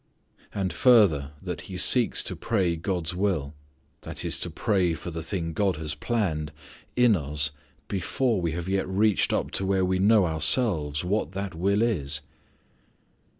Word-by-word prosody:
And 95 Hz, -2 st, -2 dB
further 90 Hz, -, +4 dB
that -, -, -6 dB
He -, -, -6 dB
seeks -, -, +4 dB
to -, -, -4 dB
pray 95 Hz, -7 st, 0 dB
God's 85 Hz, 0 st, -3 dB
will 90 Hz, -7 st, -1 dB, 0.5 s
that -, -, -4 dB
is -, -, +1 dB
to -, -, -3 dB
pray 90 Hz, -5 st, 0 dB
for 85 Hz, +3 st, -7 dB
the 80 Hz, 0 st, -5 dB
thing 80 Hz, -1 st, -4 dB
God 95 Hz, +1 st, +1 dB
has 75 Hz, -1 st, -3 dB
planned 80 Hz, -4 st, -2 dB, 0.4 s
in 125 Hz, -3 st, +4 dB
us 75 Hz, -2 st, 0 dB, 0.4 s
before 105 Hz, +3 st, -1 dB
we 85 Hz, -2 st, -1 dB
have 85 Hz, +1 st, -5 dB
yet 95 Hz, 0 st, -1 dB
reached 100 Hz, +1 st, +2 dB
up -, -, -1 dB
to -, -, -3 dB
where 95 Hz, -1 st, +2 dB
we 95 Hz, 0 st, 0 dB
know 105 Hz, 0 st, +4 dB
ourselves 80 Hz, -, +2 dB
what 90 Hz, -2 st, -1 dB
that 100 Hz, 0 st, -4 dB
will 100 Hz, +6 st, +1 dB
is. 75 Hz, -10 st, -1 dB
90 Hz, 160 wpm, -26 LUFS, 80-100 Hz, 0.5 s, further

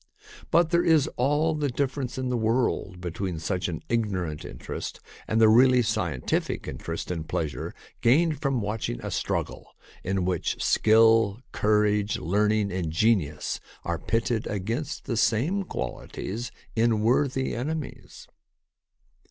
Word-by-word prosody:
But 170 Hz, 0 st, +3 dB
there 170 Hz, 0 st, +3 dB
is 160 Hz, -4 st, +4 dB
all 150 Hz, +5 st, +2 dB
the 150 Hz, -2 st, -1 dB
difference 130 Hz, 0 st, -2 dB
in 130 Hz, -1 st, -2 dB
the 125 Hz, -, 0 dB
world 110 Hz, -5 st, 0 dB
between 90 Hz, 0 st, -3 dB
such 90 Hz, +3 st, -2 dB
an 80 Hz, -3 st, -5 dB
ignorant 95 Hz, -9 st, -1 dB
interest -, -, -6 dB, 0.3 s
and 110 Hz, -, +1 dB
the 110 Hz, -, +7 dB
really 125 Hz, +3 st, +6 dB
scientific 85 Hz, -, -1 dB
interest 80 Hz, +7 st, -5 dB
and 80 Hz, -3 st, -4 dB
pleasure 75 Hz, +1 st, -3 dB, 0.3 s
gained 150 Hz, +4 st, +3 dB
from 135 Hz, -4 st, 0 dB
watch 105 Hz, +2 st, -2 dB
ing -, -, -4 dB
a -, -, -3 dB
struggle -, -, -3 dB, 0.3 s
in 95 Hz, -1 st, 0 dB
which 90 Hz, -2 st, -1 dB
skill, 110 Hz, -1 st, +4 dB
courage, 105 Hz, 0 st, +2 dB
learning, 105 Hz, +3 st, +1 dB
and 90 Hz, -3 st, -2 dB
genius 85 Hz, -5 st, +1 dB, 0.2 s
are -, -, -2 dB
pitted 115 Hz, 0 st, -1 dB
against 115 Hz, +8 st, -3 dB
the 115 Hz, -, -2 dB
same 140 Hz, -, +2 dB
qualities 110 Hz, -, -5 dB, 0.2 s
in 115 Hz, -1 st, +2 dB
worthy 130 Hz, +3 st, +1 dB
enemies. 150 Hz, +4 st, -5 dB
110 Hz, 135 wpm, -26 LUFS, 95-130 Hz, 0.3 s, the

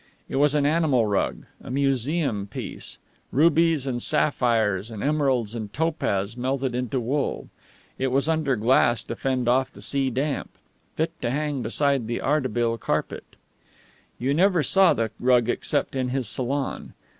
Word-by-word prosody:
It -, -, -3 dB
was 145 Hz, +1 st, +3 dB
an 145 Hz, -1 st, +2 dB
animal 145 Hz, -6 st, +2 dB
rug, 100 Hz, -2 st, -1 dB, 0.2 s
a -, -, -9 dB
museum 135 Hz, -4 st, 0 dB
piece; -, -, -5 dB, 0.3 s
rubies 160 Hz, -1 st, +3 dB
and 125 Hz, -3 st, -2 dB
sapphires 115 Hz, -9 st, +1 dB
and 110 Hz, -3 st, -6 dB
emeralds 135 Hz, -7 st, +1 dB
and 110 Hz, -3 st, -5 dB
topaz 115 Hz, -10 st, -1 dB
melted 130 Hz, +1 st, -2 dB
into 125 Hz, +1 st, -2 dB
wool. 135 Hz, +4 st, -2 dB, 0.5 s
It 135 Hz, -, +1 dB
was 135 Hz, +3 st, +2 dB
under 155 Hz, -4 st, +1 dB
glass 120 Hz, 0 st, +3 dB
to 115 Hz, -, -6 dB
fend 130 Hz, -1 st, -1 dB
off 130 Hz, +2 st, +2 dB
the -, -, -15 dB
sea 135 Hz, -1 st, +2 dB
damp. 135 Hz, +3 st, -2 dB, 0.5 s
Fit 160 Hz, +1 st, -1 dB
to 120 Hz, -, -1 dB
hang 145 Hz, 0 st, -2 dB
beside 140 Hz, -3 st, +1 dB
the 120 Hz, -, -2 dB
Ardebil 120 Hz, -5 st, 0 dB
Carpet. -, -, -3 dB, 0.8 s
You 135 Hz, +3 st, 0 dB
never 180 Hz, 0 st, +3 dB
saw 190 Hz, +2 st, +4 dB
the 115 Hz, -2 st, -1 dB
rug 125 Hz, -2 st, +3 dB
except -, -, -1 dB
in 130 Hz, -1 st, -1 dB
this 130 Hz, -3 st, 0 dB
salon. 130 Hz, +5 st, -3 dB
130 Hz, 155 wpm, -24 LUFS, 120-145 Hz, 0.8 s, saw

